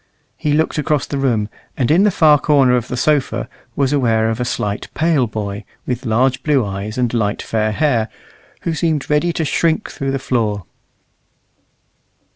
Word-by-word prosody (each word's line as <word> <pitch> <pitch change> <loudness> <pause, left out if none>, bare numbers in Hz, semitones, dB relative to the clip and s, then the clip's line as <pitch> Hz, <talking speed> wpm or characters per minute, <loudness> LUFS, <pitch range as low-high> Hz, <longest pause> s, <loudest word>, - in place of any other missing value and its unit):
He 150 - -1
looked 160 0 +1
across 150 -2 0
the 140 - -3
room, 115 -6 +1 0.3
and 130 +1 +1
in 170 +4 +5
the - - +5
far 155 -5 +5
corner 135 -5 +4
of 120 -1 -1
the 125 - -4
sofa 145 +1 +1 0.3
was 140 0 +1
aware 115 -5 +2
of 115 - -4
a 125 - 0
slight, 105 -3 -2
pale 155 -6 +2
boy, 105 -1 -4 0.2
with 125 0 -3
large 125 +4 +2
blue 140 -6 +2
eyes 100 +3 -5
and 125 -2 0
light 105 -3 0
fair 110 -1 0
hair, 120 -3 +1 0.5
who 170 - -1
seemed 160 -3 -1
ready 150 +4 +2
to 160 - -1
shrink 160 +2 0
through 135 - -3
the 135 - 0
floor. 110 -7 -1
130 Hz, 175 wpm, -18 LUFS, 110-150 Hz, 0.5 s, in